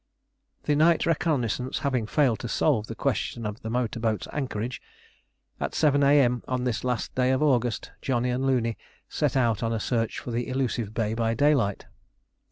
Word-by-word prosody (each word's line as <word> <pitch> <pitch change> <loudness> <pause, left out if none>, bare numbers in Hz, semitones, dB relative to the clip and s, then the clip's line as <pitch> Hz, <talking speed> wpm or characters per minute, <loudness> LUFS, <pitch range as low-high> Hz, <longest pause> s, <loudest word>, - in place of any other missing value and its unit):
The 150 - +1
night 160 +2 +4
reconnaissance 140 -6 0
having 125 -6 0
failed 130 -3 +2
to 120 - -5
solve 115 -3 +1
the - - -6
question 115 - -2
of 105 +1 -5
the 110 - -5
motor 120 -1 -1
boat's 110 -4 -1
anchorage, 125 -4 -3 0.8
at - - -3
7 145 -2 +3
A.M. 140 -4 +4
on 130 -1 -1
this 120 -4 -1
last 125 -3 -2
day 125 0 +2
of 130 +3 +2
August, 125 -5 +1
Johnny 125 -1 0
and 125 +2 -1
Looney 120 -4 0 0.3
set - - 0
out 115 -4 +2
on 115 -1 0
a 115 - -1
search 115 0 -1
for 125 - -6
the 120 +1 -2
elusive 125 -5 -2
bay 110 -2 0
by 115 0 0
daylight. 120 -7 +2
125 Hz, 175 wpm, -26 LUFS, 115-135 Hz, 0.8 s, night